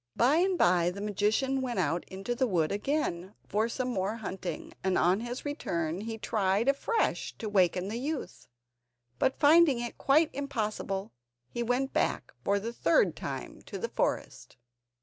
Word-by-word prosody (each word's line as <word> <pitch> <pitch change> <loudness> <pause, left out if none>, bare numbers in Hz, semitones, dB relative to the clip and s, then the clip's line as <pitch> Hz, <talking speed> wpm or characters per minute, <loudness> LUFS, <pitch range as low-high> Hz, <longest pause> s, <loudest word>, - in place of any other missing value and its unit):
By 260 +6 +4
and 370 +1 +2
by 175 - +4
the 185 +3 -7
magician 210 +6 +1
went 245 -2 -3
out 170 +1 0
into 195 +5 -4
the 255 +2 +1
wood 165 -7 +1
again 205 - -2
for 215 +3 +1
some 255 +1 -2
more 200 -2 -1
hunting, 190 -4 -5
and 190 -1 +2
on 180 +3 +3
his 240 +4 -5
return 170 - -2
he 225 +1 -4
tried 210 +1 +1
afresh 280 +12 0
to 220 - -5
waken 185 -2 +2
the 225 +3 -3
youth. 290 +3 -5 0.7
But 260 - +2
finding 305 -2 +6
it 240 0 -5
quite 300 +4 +4
impossible, 215 -7 -3 0.4
he 240 - -3
went 245 +3 0
back - - 0
for 200 0 +2
the 230 +4 -5
third 320 - +3
time - - -6
to - - -5
the 470 - -3
forest. - - -2
225 Hz, 165 wpm, -30 LUFS, 190-270 Hz, 0.7 s, finding